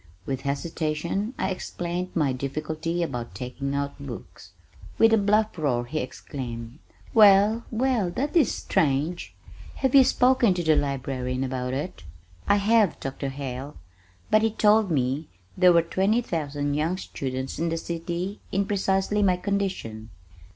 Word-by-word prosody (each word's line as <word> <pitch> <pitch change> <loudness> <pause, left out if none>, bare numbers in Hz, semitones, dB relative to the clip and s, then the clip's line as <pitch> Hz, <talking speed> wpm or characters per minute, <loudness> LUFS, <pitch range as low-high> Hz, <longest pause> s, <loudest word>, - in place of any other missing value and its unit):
With 135 -2 -3
hesitation 160 - -2
I - - -1
explained 180 0 -4
my 145 -6 +2
difficulty 155 +6 -3
about 125 -7 -5
taking 135 +2 -4
out 140 0 -2
books. 140 -4 -9 0.4
With 225 0 +5
a - - +6
bluff 210 +2 +2
roar 125 -6 0
he 155 +6 -3
exclaimed, 125 -1 -6 0.3
"Well, 210 +1 +6
well! 235 -4 +1
That 275 - -3
is 330 - +4
strange! 160 0 -1 0.4
Have 265 -2 0
you 275 -1 +9
spoken 250 -6 +3
to 175 - -2
the 160 -1 +4
Librarian 130 -2 -2
about 130 -1 -2
it?" 145 - -5 0.4
"I - - +5
have, 210 -2 +3
Dr. 135 +1 -4
Hale, 135 +1 -6 0.5
but 215 - +5
he 225 - +3
told 215 -1 +3
me 140 0 0 0.3
there 180 -1 +6
were 170 -1 +5
twenty 195 +7 +1
thousand 145 -5 -2
young 160 +5 0
students 130 -6 -5
in 165 +1 0
the 165 - -1
city 170 +4 -4
in 195 +1 +1
precisely 195 0 +1
my 185 -3 +3
condition. 180 - -3
165 Hz, 145 wpm, -25 LUFS, 135-200 Hz, 0.5 s, you